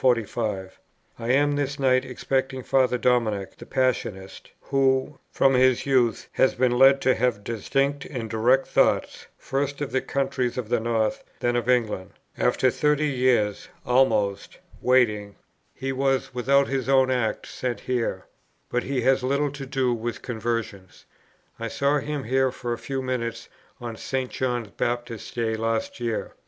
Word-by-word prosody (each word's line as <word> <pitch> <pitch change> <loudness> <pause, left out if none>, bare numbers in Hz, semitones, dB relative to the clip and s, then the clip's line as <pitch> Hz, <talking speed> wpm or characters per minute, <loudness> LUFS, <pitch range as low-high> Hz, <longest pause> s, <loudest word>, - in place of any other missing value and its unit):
I 115 - -5
am 145 +3 +3
this 145 0 -1
night 130 -2 +3
expecting 130 +1 -2
Father 130 -1 +2
Dominic, 110 -5 0
the - - -12
Passionist, 110 -7 -2
who, 135 +1 +1
from 135 - +3
his 130 -1 +3
youth, 125 -4 +2
has 130 - +2
been 125 0 +2
led 135 +2 +6
to 130 - +4
have 115 -4 0
distinct 135 +6 -1
and 120 -5 -5
direct 120 +5 +2
thoughts, - - +1
first 140 +1 -2
of 145 -2 -3
the 130 - +1
countries 130 -3 -1
of 120 -4 -4
the 120 -1 +2
North, 110 -1 -1 0.2
then 120 0 0
of 120 0 -1
England. 110 -7 0 0.2
After 130 - +2
thirty 150 +2 +1
years' 125 -6 +1 0.2
(almost) 110 -6 +1 0.2
waiting, 105 -5 +2 0.4
he 135 0 -4
was 135 -1 0
without 135 +3 +3
his 135 -1 -2
own 130 -1 +4
act 125 -4 -1
sent 125 -2 -4
here. 115 -7 -2 0.5
But 125 - +1
he 135 -1 -2
has 135 +1 +3
had 130 - -2
little 140 +1 +1
to 140 -1 -7
do 130 -2 +1
with 120 0 -4
conversions. 115 -5 -4 0.5
I 115 - -3
saw 140 +5 +1
him 145 0 -4
here 130 +2 +2
for 120 -1 -4
a - - -4
few 135 -1 -4
minutes 115 -2 -3 0.3
on 120 -2 -6
St. 130 -1 -3
John 120 -5 -2
Baptist's 120 -2 -3
day 115 -2 -1
last 115 +1 -2
year. 115 -2 -3
125 Hz, 155 wpm, -25 LUFS, 115-135 Hz, 0.5 s, led